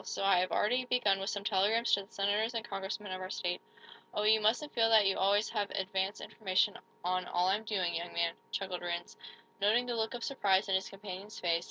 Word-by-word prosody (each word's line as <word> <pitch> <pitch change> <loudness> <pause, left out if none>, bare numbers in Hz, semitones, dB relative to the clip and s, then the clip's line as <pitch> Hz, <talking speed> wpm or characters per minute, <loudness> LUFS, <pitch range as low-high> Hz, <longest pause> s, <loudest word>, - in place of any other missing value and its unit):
So - - -4
I 195 -2 +5
have 185 +1 +1
already 250 +4 +1
begun 210 -6 +2
with 195 +2 -2
some 200 -2 -3
telegrams 210 +4 +2
to 200 - +4
the 195 - -20
Senators 210 +4 0
and 230 +1 -3
Congressmen 195 +1 -5
of 185 0 -4
our 185 - -5
state 180 -1 -2 0.5
Oh, 210 - 0
you 215 +1 +5
mustn't 240 +8 +1
feel 225 -1 +3
that 220 -2 +6
you 195 - +3
always 200 +2 +2
have 205 -3 -1
advance 190 +1 -2
information 190 -4 +1 0.3
on 185 0 0
all 180 +1 +1
I'm 205 +3 +1
doing, 190 -5 -1
young 170 +1 -4
man," 170 0 +1 0.2
chuckled 190 -2 -3
Rhinds, 175 0 -4 0.5
noting 220 +5 +3
the 245 -1 -2
look 225 +1 -1
of 240 - -6
surprise 200 -8 +2
in - - +1
his 190 0 0
companion's 195 +1 -8
face. 170 -2 +1
200 Hz, 220 wpm, -32 LUFS, 185-220 Hz, 0.5 s, that